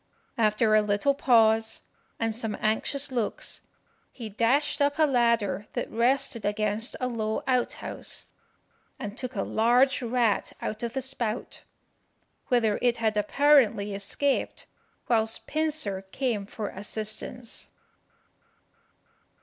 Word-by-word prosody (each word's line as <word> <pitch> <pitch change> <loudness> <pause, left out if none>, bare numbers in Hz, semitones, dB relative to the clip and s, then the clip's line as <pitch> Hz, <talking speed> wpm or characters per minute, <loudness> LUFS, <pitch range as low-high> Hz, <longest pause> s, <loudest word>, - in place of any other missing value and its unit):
After 215 0 +3
a 215 - +6
little 210 +7 +2
pause, 225 -4 +3 0.4
and 225 -1 0
some 225 -2 -3
anxious 270 +6 0
looks, 235 -4 -3 0.5
he 230 -4 -7
dashed 250 +9 +1
up 285 +1 +2
a 315 - +4
ladder 235 -6 +1
that - - -3
rested 235 -1 +1
against 210 +3 -1
a 255 - -1
low 220 -3 -2
out 255 -2 +1
house, - - -5 0.7
and 210 0 -6
took 255 0 -5
a 195 - 0
large 245 +5 +3
rat 240 -2 +1
out 215 - -4
of 235 0 -3
the 265 - -2
spout, 245 -4 -4 0.9
whither 230 -5 +2
it 240 -1 +2
had 220 -2 0
apparently 215 -3 +3
escaped 260 +8 -1 0.4
whilst 225 -2 +1
Pincer 305 -11 -1
came 230 -7 -1
for 210 -1 -5
assistance." 215 +4 -5
230 Hz, 120 wpm, -27 LUFS, 215-255 Hz, 0.9 s, a